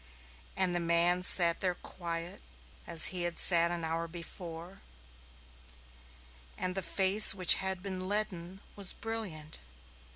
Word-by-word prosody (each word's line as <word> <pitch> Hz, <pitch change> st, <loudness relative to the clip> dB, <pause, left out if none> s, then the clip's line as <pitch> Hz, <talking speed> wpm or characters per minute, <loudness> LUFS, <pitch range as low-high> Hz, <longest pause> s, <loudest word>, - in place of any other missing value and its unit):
And 185 Hz, -2 st, -1 dB
the 175 Hz, -, -3 dB
man 170 Hz, +1 st, -1 dB
sat 170 Hz, -2 st, +1 dB
there 180 Hz, -2 st, -4 dB
quiet, 170 Hz, -1 st, -10 dB, 0.5 s
as 165 Hz, -2 st, +5 dB
he 180 Hz, -, -3 dB
had 175 Hz, -1 st, -5 dB
sat 170 Hz, -2 st, +1 dB
an 170 Hz, -1 st, -7 dB
hour 165 Hz, +1 st, -5 dB
before, 170 Hz, +1 st, -12 dB, 1.8 s
and 185 Hz, 0 st, -4 dB
the 195 Hz, -, -4 dB
face 195 Hz, +3 st, +7 dB
which 185 Hz, -3 st, +5 dB
had 190 Hz, -1 st, -5 dB
been 185 Hz, -1 st, -8 dB
leaden 190 Hz, -3 st, -5 dB
was 200 Hz, -2 st, +2 dB
brilliant. 205 Hz, -9 st, -8 dB
180 Hz, 130 wpm, -28 LUFS, 170-190 Hz, 1.8 s, face